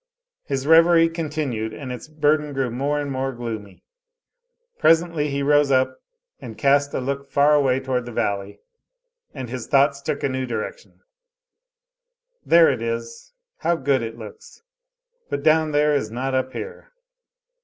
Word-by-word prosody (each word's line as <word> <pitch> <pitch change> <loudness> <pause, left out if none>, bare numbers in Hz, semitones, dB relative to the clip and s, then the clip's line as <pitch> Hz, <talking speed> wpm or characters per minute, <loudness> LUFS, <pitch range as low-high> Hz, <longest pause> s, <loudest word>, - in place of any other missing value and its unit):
His 135 -2 -3
reverie 165 +1 +6
continued, 150 -9 -3
and 135 -3 -7
its 125 - -7
burden 150 -1 0
grew 135 -3 -1
more 140 +4 -1
and 145 -1 -3
more 135 0 -2
gloomy. 110 -5 -7 1.0
Presently 165 -2 +3
he 140 0 -2
rose 145 0 +3
up 130 -1 +1 0.4
and, 110 -2 -9
cast 140 +1 +2
a - - 0
look 140 +1 -4
far 145 +2 +4
away 135 -3 +3
toward 130 -2 -2
the - - -6
valley, 100 -3 -2 0.8
and 130 -3 -5
his 125 0 -6
thoughts 140 0 +3
took 145 +1 -3
a - - +2
new 130 -1 -3
direction: 110 -3 -6 1.4
"There 165 -2 +6
it 130 - -4
is! 115 - -5 0.2
How 170 - 0
good 135 -4 +1
it 115 -1 -6
looks! 460 +1 -12 0.7
But 140 0 -3
down 155 0 +3
there 150 0 +2
is 140 -7 -1
not 130 +4 -3
up 130 0 0
here. 475 +2 -8
140 Hz, 155 wpm, -22 LUFS, 125-150 Hz, 1.4 s, reverie